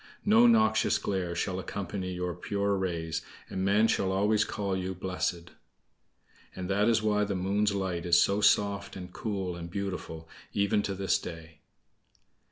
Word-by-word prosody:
No 225 +3 +6
noxious 220 -2 +4
glare 90 -3 -2
shall 95 +2 -2
accompany 95 0 -4
your 90 -1 -3
pure 100 +3 -1
rays, 85 -4 -2 0.3
and 95 - -2
men 105 +3 +4
shall 95 -3 +1
always 105 +2 +2
call 100 -3 -2
you 95 0 -3
'blessed.'" 90 -1 -3 1.0
(And 90 -1 -5
that 105 +3 +3
is 110 -1 +2
why 105 -1 +2
the 100 -1 -2
Moon's 100 +3 +1
light 90 -3 -2
is 85 0 +6
so 100 +3 +2
soft, 100 -1 +2
and 90 -1 -8
cool, 95 -5 -3
and 85 0 -7
beautiful 90 -4 -5 0.3
even 100 0 +2
to 100 -1 -3
this 95 0 +1
day.) 80 -2 -9
95 Hz, 160 wpm, -29 LUFS, 90-100 Hz, 1.0 s, No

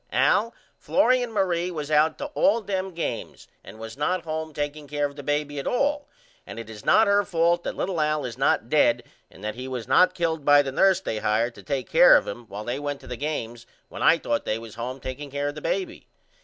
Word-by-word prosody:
Al 230 +3 +3 0.3
Florrie 255 -3 +3
and 245 -2 -3
Marie 180 -4 0
was 155 -4 -5
out 155 +1 +3
to - - -5
all 285 -5 +3
them 190 -3 -3
games 170 - -5 0.2
and 105 - -12
was 110 0 -8
not 165 +5 -1
home 160 -1 -4
takeing 145 0 -4
care 145 0 -1
of 140 0 -5
the 145 - -7
baby 145 0 -2
at 135 - -5
all 290 +3 0 0.4
and - - -10
it 115 -1 -8
is 105 -1 -11
not 220 - +5
her 200 0 +3
fault 170 -1 +1
that - - -4
little 180 -4 -2
Al 150 -2 0
is 120 -2 -5
not 130 -3 +1
dead 120 -4 +3 0.3
and 95 - -16
that 110 0 -3
he 125 +3 -7
was 125 -3 -5
not 185 0 +4
killed 165 -3 -1
by 145 0 +6
the 135 - -4
nurse 190 +6 +4
they 110 - -3
hired 115 +4 0
to - - -13
take 135 -2 -3
care - - +7
of - - -2
him 120 -1 -7
while 105 +1 -7
they 120 +5 -3
went 145 -1 -4
to - - -13
the 125 - -5
games 120 -4 -5 0.2
when - - -8
I - - +5
thought 115 - -2
they 110 - -1
was 115 -1 -10
home 125 +3 -5
takeing 135 +3 -7
care 145 +1 -2
of - - -6
the 150 - -9
baby. 355 - -3
145 Hz, 240 wpm, -25 LUFS, 125-180 Hz, 0.4 s, care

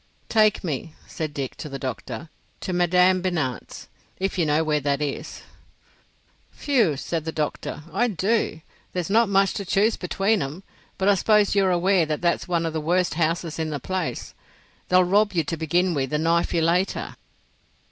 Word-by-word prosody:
"Take 215 -2 +3
me," 155 -1 -4
said 155 -2 -5
Dick, 140 -3 -4
to 150 - -7
the 135 - -5
doctor, 135 +5 -6 0.3
"to 185 - -3
Madame 180 +1 +3
Binat's—if 175 - -4
you 170 -4 +1
know 150 +2 +2
where 150 -1 +1
that 140 0 0
is." 145 -2 -4 1.2
"Whew!" 230 - +2
said 160 +3 -3
the 160 - -3
doctor, 150 -1 -3
"I 240 - +2
do. 200 -4 0 0.3
There's 180 +1 -3
not 225 0 +4
much 195 0 +3
to 200 - -4
choose 200 +4 +2
between 195 +3 0
'em; 145 +8 -5 0.3
but 190 - 0
I 205 - +6
suppose 210 +1 +3
you're 195 -2 +3
aware 180 -1 +2
that 150 -1 -2
that's 170 +1 0
one 170 -2 0
of 165 - -2
the 160 - -2
worst 175 +3 +1
houses 165 0 -1
in 160 -1 -1
the 145 -2 -3
place. 185 +7 -4 0.6
They'll 185 0 +5
rob 200 +3 +2
you 165 -3 +1
to 160 - -3
begin 175 +3 +1
with, 135 -3 -2
and 150 +1 +1
knife 170 +1 +2
you 165 -2 +1
later." 175 +4 0
175 Hz, 175 wpm, -24 LUFS, 155-195 Hz, 1.2 s, I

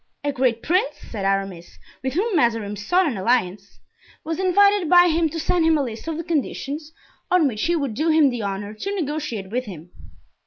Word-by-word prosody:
"A 290 - 0
great 250 -4 0
prince," 370 +9 +1 0.2
said 205 -4 -4
Aramis, 195 -3 -2 0.2
"with 260 -1 -3
whom 400 +5 0
Mazarin 230 -7 +1
sought 355 - +1
an 270 -10 -2
alliance, 200 -2 -1 0.4
was 325 +2 -4
invited 400 -1 +3
by 355 0 +7
him 325 0 +1
to 330 - -5
send 335 +1 +1
him 320 -1 +4
a 285 - 0
list 230 +2 -7
of 325 -1 -3
the 335 - -4
conditions 300 -1 -3 0.4
on 360 -5 +4
which 215 -2 -2
he 345 - +2
would 280 -7 -2
do 310 +8 0
him 310 -4 +4
the 240 -2 -4
honor 200 +1 -4
to 395 - -4
negotiate 290 - -4
with 250 +2 -2
him. 175 -4 -10
280 Hz, 200 wpm, -22 LUFS, 215-330 Hz, 0.4 s, by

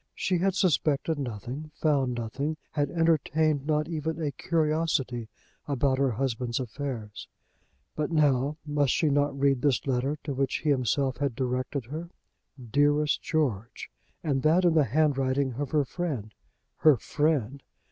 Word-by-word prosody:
She 180 -2 0
had 190 +1 +1
suspected 160 -4 +1
nothing, 130 +4 -5
found 135 -5 +1
nothing, 140 +7 -3
had 145 -2 0
entertained 155 -2 +1
not 150 -1 +1
even 160 -1 -3
any 150 -3 -1
curiosity 150 -7 0 0.4
about 135 -1 +1
her 135 -1 +3
husband's 120 0 -2
affairs. 120 -4 -5 0.7
But 150 +2 -2
now 145 -2 +2
must 145 -2 +1
she 155 - +2
not 145 0 +1
read 135 -2 +2
this 140 -4 +1
letter 135 +2 0
to 145 - -3
which 135 0 0
he 150 - +3
himself 130 0 +1
had 140 -4 -1
directed 130 +1 -2
her? 160 +7 -6 0.5
Dearest 145 +5 +2
George! 125 -10 -2 0.3
And 140 -4 0
that 165 +6 +4
in 170 - +4
the 155 -3 +4
handwriting 135 -1 +1
of 140 +2 -3
her 150 -1 +2
friend, 130 - -4 0.4
her 155 -4 +5
friend! 140 -2 0
140 Hz, 145 wpm, -28 LUFS, 130-155 Hz, 0.7 s, her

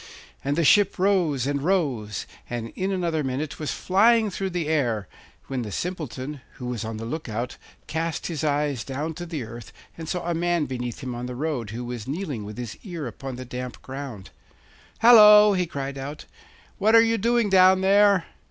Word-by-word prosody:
And 140 +2 -1
the 170 - +2
ship 200 +7 +4
rose 180 - +2
and 140 0 -1
rose, 135 - -1 0.2
and 120 -1 -4
in 190 +1 -3
another 170 -5 -1
minute 135 +3 -3
was 155 - -3
flying 220 +3 +3
through 190 +1 -3
the 175 -4 -2
air, 120 - 0 0.4
when 135 -2 -3
the 110 -3 -5
Simpleton, 150 - -5
who 125 - -9
was 125 -2 -3
on 110 0 -5
the 115 - -6
look 150 +3 -5
out, 115 +3 -4 0.3
cast 160 0 -3
his 160 -3 -3
eyes 145 -4 0
down 145 +4 -4
to 175 +2 -7
the 155 -6 -4
earth 115 +1 -10 0.2
and 160 -1 -7
saw 175 -1 -3
a 175 - +1
man 170 -1 +1
beneath 125 -3 -5
him 130 -1 -4
on 120 +1 -5
the 125 - -6
road, 135 -6 -3
who 120 +3 -5
was 120 -2 -6
kneeling 145 - -4
with 105 +2 -8
his 120 -3 -6
ear 170 -7 -6
upon 130 +2 -6
the 130 +1 -7
damp 125 0 -6
ground. 130 -7 -7 0.7
'Hallo!' 210 -3 +9
he 180 -2 0
called 140 -2 -5
out, 145 +3 -7 0.5
'what 220 +2 +4
are 230 - +8
you 230 0 +1
doing 235 +1 +2
down 190 -1 +5
there? 200 -1 +4
150 Hz, 195 wpm, -25 LUFS, 125-185 Hz, 0.7 s, Hallo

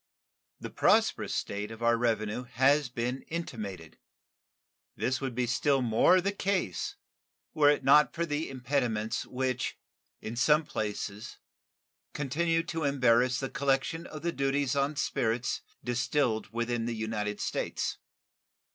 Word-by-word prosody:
The - - -7
prosperous - - +2
state 100 +1 -3
of 115 +1 -8
our 115 0 +4
revenue 115 0 -1
has 135 +3 +3
been 125 +2 -3
intimated. 105 - -6 1.0
This 130 +1 -1
would 130 -3 -3
be 125 0 +1
still 135 +2 +2
more 120 +10 +5
the 200 +2 0
case 190 - -1 0.6
were 145 -2 +5
it 145 -2 +2
not 150 +3 +6
for 170 0 -2
the 150 0 -2
impediments 125 -4 -1
which 130 -1 -2 0.4
in 110 - -6
some 150 +5 +3
places 105 -2 -4 0.8
continue 165 +4 0
to 165 -1 -4
embarrass 125 -3 +3
the 135 - -2
collection 140 +3 0
of 155 0 -9
the 170 - 0
duties 140 -1 0
on 140 +2 +1
spirits 120 -4 -1 0.2
distilled 125 -1 0
within 120 0 -1
the 120 - -2
United 110 -2 -3
States. - - -2
130 Hz, 130 wpm, -30 LUFS, 115-145 Hz, 1.0 s, not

